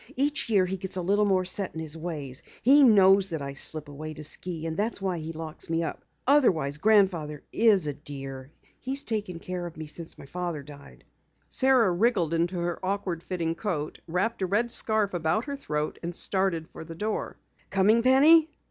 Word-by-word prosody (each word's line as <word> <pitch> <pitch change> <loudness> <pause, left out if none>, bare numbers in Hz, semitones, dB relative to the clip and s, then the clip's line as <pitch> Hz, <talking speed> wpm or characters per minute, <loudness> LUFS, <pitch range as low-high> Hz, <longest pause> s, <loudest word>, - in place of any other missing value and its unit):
Each 285 0 +1
year 200 -4 +4
he 190 +1 -3
gets 190 +1 -5
a 185 - -2
little 205 +3 +2
more 190 -2 +2
set 185 0 -3
in - - -4
his 160 -1 -3
ways. 150 -6 -5 0.2
He 275 +5 +7
knows 195 -4 +6
that 160 -4 -4
I 140 0 -5
slip 150 +2 -1
away 155 +2 -7
to 155 - -8
ski, 165 +1 -2
and 160 -1 -3
that's 215 +5 -1
why 190 -3 -2
he 160 +1 -5
locks 160 -1 -7
me 165 0 0
up. - - -5 0.2
Otherwise, 165 - +3
Grandfather 185 -8 +2
is 215 -7 +4
a 145 - -2
dear. 135 -2 -8 0.3
He's 270 +2 -2
taken 210 -6 -3
care 180 +1 -5
of 165 - -12
me 155 - -6
since 160 +2 -6
my - - -11
father 170 -1 -4
died." 140 0 -14 0.5
Sara 255 -7 +4
wriggled 180 -3 +1
into 170 +2 0
her 175 +1 -3
awkward 185 -3 -2
fitting 170 -3 -2
coat, 165 -5 -4
wrapped 190 +7 -1
a 190 - +1
red 230 +6 0
scarf 215 -4 +1
about 175 +6 0
her 280 -1 -4
throat 150 - -3
and 175 0 -5
started 190 -5 0
for - - -10
the 165 +1 -9
door. 210 +5 -3 0.3
"Coming, 210 +4 +3
Penny?" 300 +6 +6
180 Hz, 195 wpm, -27 LUFS, 160-210 Hz, 0.5 s, He